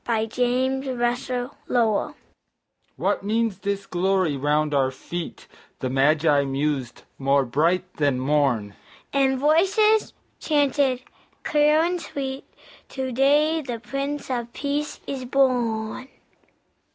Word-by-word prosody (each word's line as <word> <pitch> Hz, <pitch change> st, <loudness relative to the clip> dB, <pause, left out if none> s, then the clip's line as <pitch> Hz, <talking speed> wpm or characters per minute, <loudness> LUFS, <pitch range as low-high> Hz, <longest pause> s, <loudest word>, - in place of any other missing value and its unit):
A 220 Hz, -1 st, +1 dB
CHRISTMAS 250 Hz, +1 st, 0 dB
CAROL 245 Hz, -3 st, -1 dB, 0.8 s
"What -, -, -1 dB
means 220 Hz, -1 st, 0 dB
this 200 Hz, -1 st, -3 dB
glory 185 Hz, -4 st, +1 dB
round 150 Hz, +2 st, +1 dB
our 135 Hz, -2 st, +3 dB
feet," 170 Hz, +6 st, -7 dB, 0.3 s
The 130 Hz, -, -3 dB
Magi 145 Hz, +2 st, +3 dB
mused, 135 Hz, -2 st, -2 dB, 0.2 s
"more 135 Hz, 0 st, +2 dB
bright 170 Hz, +8 st, 0 dB
than 145 Hz, -4 st, +1 dB
morn?" 130 Hz, -7 st, +1 dB, 0.4 s
And 270 Hz, -1 st, +2 dB
voices 390 Hz, +10 st, +3 dB, 0.3 s
chanted 280 Hz, -4 st, +1 dB, 0.4 s
clear 300 Hz, +1 st, +3 dB
and 350 Hz, 0 st, -1 dB
sweet, 270 Hz, -4 st, -5 dB, 0.4 s
"To 260 Hz, -1 st, -4 dB
day 295 Hz, +5 st, +3 dB
the 250 Hz, -5 st, -5 dB
Prince 275 Hz, +3 st, -4 dB
of 240 Hz, -2 st, -3 dB
Peace 290 Hz, +1 st, -3 dB
is 270 Hz, -2 st, -4 dB
born." 245 Hz, -3 st, 0 dB
240 Hz, 110 wpm, -24 LUFS, -, 0.8 s, our